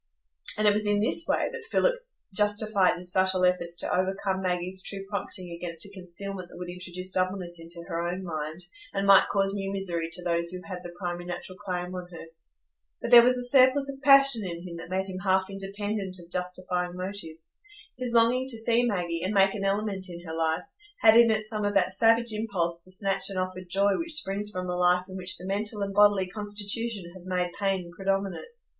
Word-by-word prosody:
And 215 0 +3
it 205 - +6
was 210 0 0
in 205 0 +2
this 245 +10 +2
way - - +1
that 470 -1 -7
Philip - - +3 0.4
justified 205 -1 +2
his 180 0 -4
subtle 185 -1 +3
efforts 175 -1 0
to - - 0
overcome 190 +1 -1
Maggie's 185 0 -2
true 195 0 -3
prompting 185 -3 -3
against 170 0 -4
a 200 - -8
concealment 185 0 -6
that - - -13
would 175 0 -6
introduce 180 +1 -5
doubleness 185 -2 -2
into 170 +1 -7
her 165 -2 -2
own 180 +2 -4
mind, 155 -1 -5 0.3
and 195 0 0
might 195 -1 +7
cause 195 -1 +1
new 195 -1 -3
misery 175 -4 -3
to 180 +1 -5
those 170 -1 0
who 180 +1 -5
had 185 -2 -6
the 175 - -7
primary 175 -1 -4
natural 175 +1 -6
claim 180 -2 -4
on 180 -1 -6
her. 170 -2 -10 0.7
But - - -5
there 240 - +11
was 250 +1 +4
a 245 - 0
surplus 265 +2 +4
of 270 - -15
passion 275 -5 +6
in 175 -1 -6
him 170 -1 -7
that 165 - -9
made 190 +1 -1
him 185 -1 -6
half 190 0 +1
independent 195 0 -4
of 170 0 -15
justifying 180 0 -3
motives. 180 -4 -6 0.4
His 250 -1 -4
longing 240 +3 +3
to 235 - 0
see 230 +1 +2
Maggie, 175 -7 -1
and 195 +3 -1
make 195 0 +5
an 200 - -4
element 195 -1 -1
in 175 0 -9
her 160 - -6
life, 160 +1 0 0.4
had 220 0 +7
in 235 0 +7
it 215 -1 +1
some 215 -1 -3
of 205 0 -1
that 185 -1 +2
savage 230 +3 +3
impulse 175 -6 -2
to - - -1
snatch 195 0 +3
an 195 - -5
offered 185 0 -4
joy 195 +2 +2
which 335 -1 -3
springs 205 -6 0
from 185 -3 -4
a 180 - -2
life 180 0 +3
in 190 - -9
which 185 -1 +2
the 180 - -7
mental 205 +2 -2
and 200 0 -4
bodily 205 -1 +5
constitution 205 0 -2
have 185 -1 -13
made 180 -1 -1
pain 190 -3 -1
predominate. 195 - -2
190 Hz, 210 wpm, -27 LUFS, 180-205 Hz, 0.7 s, there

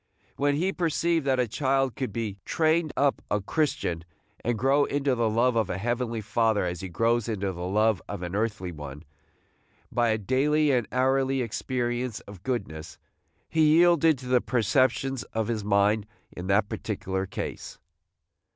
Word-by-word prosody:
When 145 0 +1
he 185 +6 0
perceived 165 -2 0
that 130 -1 +2
a 125 - +2
child 135 0 0
could 130 -5 -3
be 105 -2 -4
trained 160 0 +1
up 140 0 +2
a 105 - +1
Christian, 95 - -1 0.4
and 120 0 0
grow 135 +4 +3
into 140 -1 0
the 115 -2 +1
love 120 +3 +2
of 110 -3 +1
a 90 - -2
Heavenly 115 +1 -2
Father 110 -1 +1
as 90 -1 -3
he 95 - -5
grows 115 +5 +1
into 100 -3 -1
the 90 0 -5
love 105 +1 +2
of 90 - -5
an 90 0 -5
earthly 105 -3 -2
one, 75 -1 -8 0.9
by 120 -1 +2
a 110 - +2
daily 145 +7 +2
and 125 -4 +1
hourly 135 0 +1
experience 120 0 -2
of 100 -3 -12
goodness, 80 -10 -4 0.5
he 155 -1 +4
yielded 165 -3 +5
to 125 0 -10
the 125 -1 +3
perceptions 130 +2 +1
of 110 -1 -1
his 110 -3 -2
mind 105 +1 +2 0.2
in 90 +1 -7
that 100 +1 +3
particular 95 -1 -3
case. - - -6
120 Hz, 165 wpm, -27 LUFS, 100-135 Hz, 0.9 s, yielded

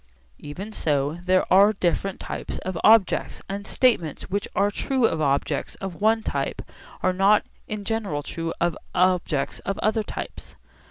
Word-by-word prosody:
Even 190 +9 -7
so, 150 -3 0
there 185 0 +3
are 200 +3 +7
different 190 0 -1
types - - -5
of 185 -1 -5
objects, 220 -3 +4
and 200 +1 -5
statements 185 - +1
which 200 +1 -1
are 200 +2 +2
true 260 +2 0
of 160 -7 +1
objects 140 -1 0
of 195 -1 -7
one 220 +1 +3
type - - -2 0.4
are 185 - +3
not 195 +3 +4 0.2
in 210 -1 -4
general 200 -10 -2
true 165 +2 -4
of 170 -1 +1 0.2
objects 180 -6 +1
of 195 - -3
other 220 +1 +1
types. - - -7
195 Hz, 155 wpm, -24 LUFS, 170-210 Hz, 0.4 s, are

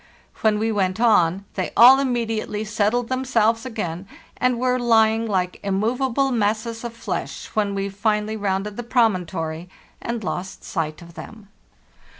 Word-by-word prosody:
When 215 -1 +3
we 220 +1 0
went 190 -2 0
on, 195 -5 +3
they 185 - -2
all 255 +3 +9
immediately 225 -5 -2
settled 220 +2 0
themselves 240 -2 +1
again, 190 -6 -5 0.3
and 250 -1 +1
were 255 +1 +1
lying 225 -1 +3
lke 185 -3 -1
immovable 245 +7 0
masses 225 0 -1
of 235 -1 -5
flesh 230 - -5
when 205 -2 0
we 195 0 -1
finally 210 +2 -1
rounded 200 0 -2
the - - -2
promontory 180 -8 0 0.3
and 235 -1 -4
lost 185 +1 -5
sight 160 -1 -4
of 170 0 -14
them." 215 +3 -11
220 Hz, 145 wpm, -22 LUFS, 195-235 Hz, 0.3 s, all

